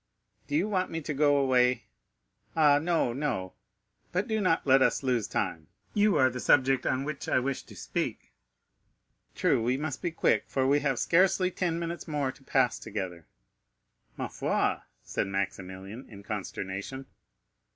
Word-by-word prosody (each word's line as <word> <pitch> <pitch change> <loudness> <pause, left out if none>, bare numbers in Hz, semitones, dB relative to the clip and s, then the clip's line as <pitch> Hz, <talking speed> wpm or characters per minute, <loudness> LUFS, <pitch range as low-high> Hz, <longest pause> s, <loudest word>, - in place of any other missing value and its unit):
"Do 145 - -2
you 175 +7 +2
want 185 -3 0
me 165 - -3
to 150 0 -3
go 145 0 +4
away?" 125 -3 +3 0.7
"Ah, 150 -3 +5
no, 160 -6 +1
no. 120 -10 -2 0.6
But 185 +3 0
do 220 -1 0
not 175 -4 +2
let 135 -1 +5
us - - +2
lose 125 -5 +1
time; 80 -2 -2 0.3
you 205 -1 +3
are 130 -1 +4
the 125 - -5
subject 130 +1 +3
on 130 +1 +1
which 150 0 -5
I - - +3
wish 130 +1 -1
to - - -15
speak." - - -4 1.0
"True, - - +2
we 125 +3 +1
must 145 -1 -4
be 175 - 0
quick, 165 - +1
for 135 -1 0
we 140 +2 +4
have 140 -3 0
scarcely 185 +4 +3
ten 175 -2 -1
minutes 170 +1 -4
more 145 -4 -1
to 135 - -20
pass 130 -2 +2
together." 90 -5 -5 0.9
"Ma - - -2
foi!" - - 0 0.3
said - - -2
Maximilian, 95 +3 -5
in 100 -2 -11
consternation. 100 +4 -5
135 Hz, 160 wpm, -29 LUFS, 115-160 Hz, 1.0 s, Ah